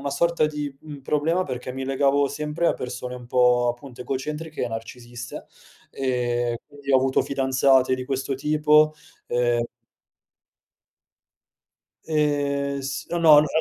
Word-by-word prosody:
una 140 - -3
sorta 170 +2 +2
di, 150 -2 -4
uhm, 145 -3 -10
problema 160 +6 +1
perché 125 -3 -5
mi 130 +1 -5
legavo 140 +1 +2
sempre 150 +4 -2
a - - +4
persone 125 0 -6
un 125 -1 -11
po' 125 0 +3
appunto 120 +1 -6
egocentriche 150 +5 -4
e - - -3
narcisiste, 120 +1 -8 0.5
ehm 120 -2 -1
quindi 145 -1 -8
ho 135 - +6
avuto 130 0 +2
fidanzate 135 -1 +3
di 130 0 -6
questo 135 0 -2
tipo 150 +2 +3 0.3
ehm 120 -1 +1 2.4
Ehm 145 -2 0
s 135 0 -5
no, 175 - -1
no 160 -3 +8
allo 150 +1 +6
135 Hz, 135 wpm, -24 LUFS, 125-150 Hz, 2.4 s, no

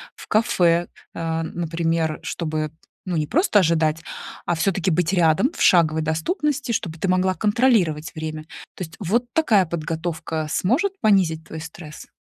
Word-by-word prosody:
в - - -12
кафе, 175 -6 +2 0.3
э, 165 -1 -2
например, 165 -1 -1
чтобы, 155 -2 -3 0.3
ну, 180 -2 -2
не 150 -1 -1
просто 330 - +3
ожидать, 160 -3 +2 0.4
а 175 - 0
всё-таки 185 +1 0
быть 170 +1 +1
рядом, 175 - +3
в - - -7
шаговой 160 -3 +4
доступности, 265 - -1
чтобы 165 -7 -3
ты 195 - -1
могла 185 +1 +2
контролировать 205 -8 +1
время. 155 -1 -5 0.3
То - - -5
есть 160 - -15
вот 220 +5 0
такая 225 -12 +3
подготовка 160 -1 -3
сможет 265 - +1
понизить 180 -7 +3
твой 160 - -8
стресс? 160 -1 -10
170 Hz, 145 wpm, -22 LUFS, 160-195 Hz, 0.4 s, шаговой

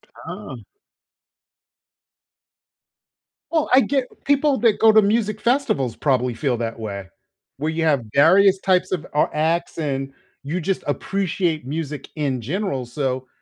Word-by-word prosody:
Ah. - - -8 2.9
Well, 320 -3 +1
I 260 - +8
get 270 -2 0 0.2
people 285 0 +3
that 225 -3 +3
go 220 0 +7
to 220 - +6
music 215 0 0
festivals 235 - 0
probably 125 -3 +1
feel 125 0 -1
that 115 0 -4
way, 100 -4 -6 0.5
where 155 +4 -2
you 165 0 -2
have 145 -6 +2
various 190 +6 +5
types 185 -1 +1
of, 175 -4 -2
uh, 150 - +4
acts, 160 +3 0
and 135 -3 -3 0.3
you 160 +6 -3
just 190 +3 -2
appreciate 170 -1 -1
music 150 +1 -5
in 140 -5 -1
general, 140 - -2
so 130 0 -3
160 Hz, 135 wpm, -22 LUFS, 135-200 Hz, 2.9 s, I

